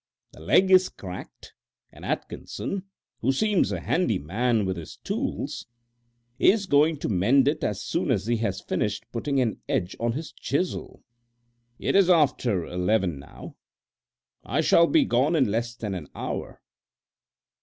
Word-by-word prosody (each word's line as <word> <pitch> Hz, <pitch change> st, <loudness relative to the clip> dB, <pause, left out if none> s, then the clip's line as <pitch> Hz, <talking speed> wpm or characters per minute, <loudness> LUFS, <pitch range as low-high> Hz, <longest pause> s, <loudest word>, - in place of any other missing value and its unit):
The -, -, -15 dB
leg 185 Hz, -, +3 dB
is 185 Hz, 0 st, +6 dB
cracked, 90 Hz, -1 st, -10 dB, 0.4 s
and -, -, -15 dB
Atkinson, 195 Hz, -1 st, -4 dB, 0.3 s
who 130 Hz, -, +2 dB
seems 205 Hz, +7 st, +1 dB
a -, -, -3 dB
handy 160 Hz, -, +1 dB
man 110 Hz, -, 0 dB
with 95 Hz, 0 st, -1 dB
his 85 Hz, -3 st, -8 dB
tools, -, -, -4 dB, 0.7 s
is 200 Hz, +5 st, +4 dB
going 150 Hz, -1 st, +3 dB
to -, -, -1 dB
mend 115 Hz, +8 st, +3 dB
it 150 Hz, +1 st, 0 dB
as 105 Hz, -, -2 dB
soon -, -, -1 dB
as -, -, +1 dB
he 120 Hz, +1 st, +1 dB
has 100 Hz, -4 st, -2 dB
finished 105 Hz, +2 st, -2 dB
putting 135 Hz, +4 st, -1 dB
an 120 Hz, -4 st, -1 dB
edge 90 Hz, -, -1 dB
on 115 Hz, 0 st, 0 dB
his 155 Hz, +5 st, -5 dB
chisel. 145 Hz, +8 st, -3 dB, 0.7 s
It -, -, -1 dB
is 195 Hz, -2 st, +5 dB
after 130 Hz, -, +3 dB
eleven 90 Hz, -3 st, 0 dB
now. 70 Hz, -, -12 dB, 0.9 s
I -, -, 0 dB
shall 170 Hz, -, +5 dB
be 305 Hz, -4 st, +4 dB
gone 145 Hz, -, +2 dB
in 140 Hz, -5 st, +4 dB
less 120 Hz, +2 st, -2 dB
than 105 Hz, -4 st, -4 dB
an 85 Hz, -6 st, -6 dB
hour. -, -, -5 dB
120 Hz, 155 wpm, -26 LUFS, 100-160 Hz, 0.9 s, is